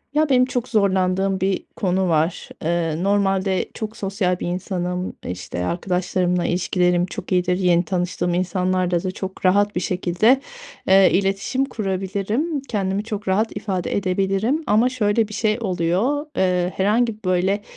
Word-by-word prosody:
Ya, 305 0 +3
benim 255 -1 +5
çok 250 -1 -3
zorlandığım 190 -2 +1
bir 190 +1 -1
konu 190 -2 0
var. 160 +1 0 0.2
Eee, 165 -1 0
normalde 195 -1 +1
çok 220 0 -5
sosyal 190 -2 -1
bir - - -3
insanım. 180 0 -3
İşte, 90 0 -4
arkadaşlarımla 180 - 0
ilişkilerim 180 0 +1
çok 185 - -7
iyidir, 180 0 +2
yeni 175 -2 +3
tanıştığım 175 0 -1
insanlarla 185 -1 0
da 185 - -2
çok 190 0 -5
rahat 205 +2 +3
bir - - +1
şekilde, 185 +8 +2 0.5
eee, 190 0 +6
iletişim 195 +7 0
kurabilirim, 210 - -2
kendimi 195 -1 -1
çok 210 -3 -5
rahat 215 +4 +1
ifade 185 -4 -2
edebilirim. 195 - 0
Ama 220 +3 +4
şöyle 220 -3 +1
bir 215 - -8
şey 215 +1 +1
oluyor: 195 - 0
Eee, 180 -1 +1
herhangi, 215 +2 +1
böyle, 185 +3 +1
190 Hz, 140 wpm, -21 LUFS, 180-210 Hz, 0.5 s, eee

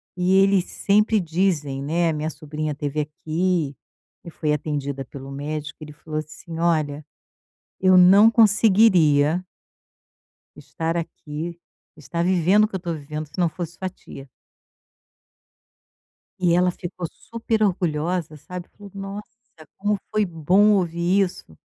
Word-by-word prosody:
E 180 +1 +1
eles 195 -2 +3
sempre 210 +2 +2
dizem, 160 -6 -1
né, 165 +3 +1
a - - 0
minha 155 +1 -2
sobrinha 155 0 -5
esteve 145 +1 -2
aqui, 155 0 -2 0.5
e - - -7
foi 155 -2 -2
atendida 140 -2 -3
pelo 135 +1 -10
médico, 150 +2 -5
ele 150 -1 -9
falou 155 +1 -5
assim: 155 +2 -9
"Olha, 155 -3 0 0.8
eu 185 0 +5
não 195 +5 +7
conseguiria" 185 -8 +4 1.1
"estar 160 +3 -4
aqui, 165 0 -5 0.4
estar 160 +4 -3
vivendo 185 +3 +4
o - - 0
que 200 - -5
eu 185 - -5
tô 170 -2 -3
vivendo 150 +1 -6
se 150 - -15
não 175 - +3
fosse 170 0 -6
sua 185 - -3
tia." 135 -6 -13 2.1
E 175 -2 +2
ela 180 +1 +3
ficou 175 0 -6
super 225 -1 -3
orgulhosa, 170 -4 -1
sabe. 180 +4 -9
Falou: 205 -1 -14
"Nossa, 195 +1 -6 0.5
como 205 +1 0
foi 215 0 +2
bom 180 +5 +3
ouvir 180 +1 +2
isso." 130 - -9
170 Hz, 135 wpm, -23 LUFS, 150-185 Hz, 2.1 s, não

